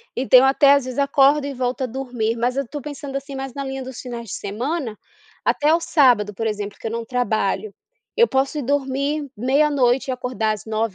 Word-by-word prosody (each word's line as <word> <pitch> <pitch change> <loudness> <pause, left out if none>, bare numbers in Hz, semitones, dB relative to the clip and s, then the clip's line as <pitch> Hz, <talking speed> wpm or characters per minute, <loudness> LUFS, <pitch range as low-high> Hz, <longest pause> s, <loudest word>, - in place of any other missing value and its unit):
Então 255 0 +6
eu 265 - +4
até, 275 +1 +5
às 280 -2 +2
vezes, 255 +2 -4
acordo 280 +1 +4
e 280 - -4
volto 255 +1 -2
a - - +1
dormir, 245 -3 -3
mas 245 +3 0
eu 275 - +1
estou 290 +3 -7
pensando, 285 0 -7
assim, 275 0 -5
mas 270 -1 -5
na 280 - -4
linha 270 -1 -5
dos 255 -1 -8
finais 235 -3 -7
de - - -5
semana, 235 +3 -3 0.5
até 300 +2 +3
o 335 - +3
sábado, 245 -11 +3
por 225 +3 -4
exemplo, 205 -1 -4
que - - -5
eu 220 - -4
não 230 0 -4
trabalho, 245 - -1 0.4
eu 470 0 +6
posso 270 +3 0
ir 290 - -2
dormir 280 +2 -1
meia 270 +6 +2
noite 265 -1 +2
e - - +1
acordar 250 -3 -1
às 215 - -5
nove 220 0 -2
265 Hz, 225 wpm, -21 LUFS, 235-280 Hz, 0.5 s, Então